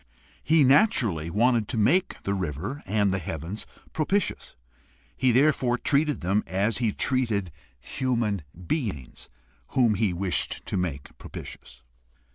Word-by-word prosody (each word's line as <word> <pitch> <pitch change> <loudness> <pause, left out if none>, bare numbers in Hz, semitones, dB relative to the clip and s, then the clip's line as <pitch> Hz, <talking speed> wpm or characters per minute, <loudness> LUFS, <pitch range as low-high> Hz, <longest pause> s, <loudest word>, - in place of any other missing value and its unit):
He 160 -1 +4
naturally 125 - +3
wanted 115 +3 +2
to 120 - -3
make 175 - +2
the 100 - -1
river 95 - -4
and 100 0 +2
the 95 - 0
heavens 85 +5 -6 0.3
propitious. 190 +6 -1 0.6
He 130 - +2
therefore 130 -1 +3
treated 150 +2 +1
them 100 +4 +1
as 100 +4 0
he 115 -4 +1
treated 110 -8 0 0.3
human 115 - -1 0.2
beings 95 - -4 0.5
whom 120 -4 +5
he 105 -1 +1
wished 90 -4 -1
to - - -3
make 85 -7 -3
propitious. - - -10
105 Hz, 125 wpm, -26 LUFS, 95-130 Hz, 0.6 s, whom